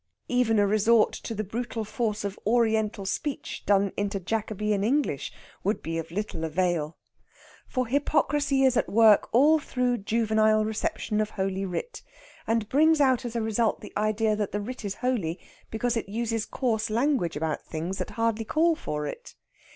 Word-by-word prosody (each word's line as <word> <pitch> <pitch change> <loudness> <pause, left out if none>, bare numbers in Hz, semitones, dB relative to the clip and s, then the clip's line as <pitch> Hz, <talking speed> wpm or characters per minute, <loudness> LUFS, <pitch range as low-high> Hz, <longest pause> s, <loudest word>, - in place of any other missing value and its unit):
Even 245 -3 +2
a 205 - +4
resort 215 +2 +3
to 225 - -6
the 215 - -2
brutal 225 +2 -4
force 215 -1 -2
of 200 0 -4
Oriental 220 -3 +1
speech 280 +8 -3
done 200 -1 +3
into 205 0 -2
Jacobean 210 0 -1
English 275 +7 0 0.3
would 210 - -1
be 165 0 -2
of 165 - -6
little 200 -2 -4
avail. 165 -2 -1 0.7
For 255 -1 -1
hypocrisy 285 +1 +1
is 260 -1 +4
at 245 - +1
work 220 -1 +5
all 300 +6 +5
through 250 -4 -1
juvenile 215 0 +2
reception 215 0 -1
of 215 - -1
Holy 195 -1 -2
Writ, 195 - -5 0.5
and 225 -2 +1
brings 315 +5 +4
out 260 -3 +3
as 240 -1 -5
a 230 - 0
result 220 0 0
the - - -10
idea 215 +1 +1
that 210 -2 -2
that 205 - -1
writ 250 +3 -6
is 200 -1 -3
holy 185 -10 0 0.3
because 240 +2 -1
it 225 -4 -3
uses 225 0 -2
coarse 225 -5 -1
language 230 - +1
about 155 0 -2
things 170 +5 -4
that 185 - -3
hardly 225 -1 +1
call 325 +7 +2
for 150 - -4
it. 145 - -8
220 Hz, 170 wpm, -27 LUFS, 200-245 Hz, 0.7 s, work